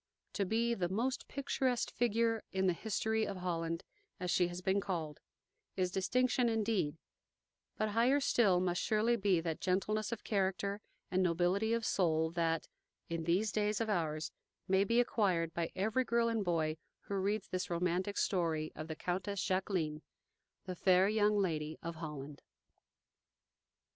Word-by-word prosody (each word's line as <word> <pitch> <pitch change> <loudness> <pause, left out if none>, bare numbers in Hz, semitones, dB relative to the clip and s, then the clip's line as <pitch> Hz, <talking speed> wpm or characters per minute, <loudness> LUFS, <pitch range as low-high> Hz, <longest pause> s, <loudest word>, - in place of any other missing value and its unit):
To 200 - 0
be 230 +3 +1
"the 180 -6 -1
most 245 +8 -1
picturesque 265 -3 -1
figure 230 -1 +1
in 190 0 0
the 180 - +3
history 220 +3 -1
of 200 -3 -3
Holland," 165 -1 -2 0.4
as 180 -1 -1
she 180 -1 +3
has 175 0 -6
been 190 +2 +1
called, 160 -6 -3 0.6
is 185 -1 0
distinction 245 +5 +2
indeed; 215 -9 0 0.8
but 215 - 0
higher 240 +6 +3
still 210 -9 +3
must 180 -1 0
surely 220 +2 +2
be 195 -5 +2
that 165 -2 -3
gentleness 215 +4 0
of 235 - -4
character 200 0 -1 0.3
and 185 - +2
nobility 180 +5 +2
of 230 -1 0
soul 160 -3 +2
that, 165 -1 0 0.4
in 165 -1 -3
these 190 +6 +2
days 210 -1 0
of 225 -2 0
ours, 155 -4 -1 0.4
may 190 +1 +4
be 230 +4 +2
acquired 185 -9 +1
by 170 -1 -2
every 220 +7 +1
girl 235 -1 +2
and 225 -2 0
boy 160 -3 0 0.2
who - - -7
reads 200 +1 -1
this 185 0 -2
romantic 180 +3 0
story 165 -5 0
of 155 +1 -6
the 160 - -4
Countess 185 +4 -2
Jacqueline, 185 -5 -1 0.6
the 185 -1 -4
fair 185 +1 +4
young 210 -1 +3
Lady 160 -5 -1
of 165 0 -5
Holland. 150 -3 -7
190 Hz, 155 wpm, -34 LUFS, 170-215 Hz, 0.8 s, may